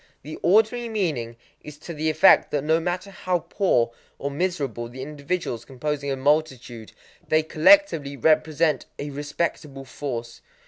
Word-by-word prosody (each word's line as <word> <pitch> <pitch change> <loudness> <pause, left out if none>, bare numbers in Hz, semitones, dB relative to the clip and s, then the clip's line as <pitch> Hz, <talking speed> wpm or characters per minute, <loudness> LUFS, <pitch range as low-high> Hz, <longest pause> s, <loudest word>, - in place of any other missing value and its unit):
The 155 +3 -8
ordinary 220 +5 +3
meaning 150 - -2 0.3
is 150 -1 -10
to 170 +3 -8
the 155 0 -1
effect 155 +5 +5
that 145 -2 -1
no 160 +2 +2
matter 180 +3 -3
how 185 -1 -1
poor 155 - 0 0.3
or 140 - -4
miserable 140 - -2
the 130 +2 -8
individuals 145 -4 -4
composing 140 +2 -4
a - - 0
multitude, 130 -5 -1 0.4
they 155 0 +3
collectively 160 - +4
represent 155 0 +2
a 145 0 -5
respectable 145 -1 -4
force. 125 -3 -6
150 Hz, 140 wpm, -24 LUFS, 135-170 Hz, 0.4 s, effect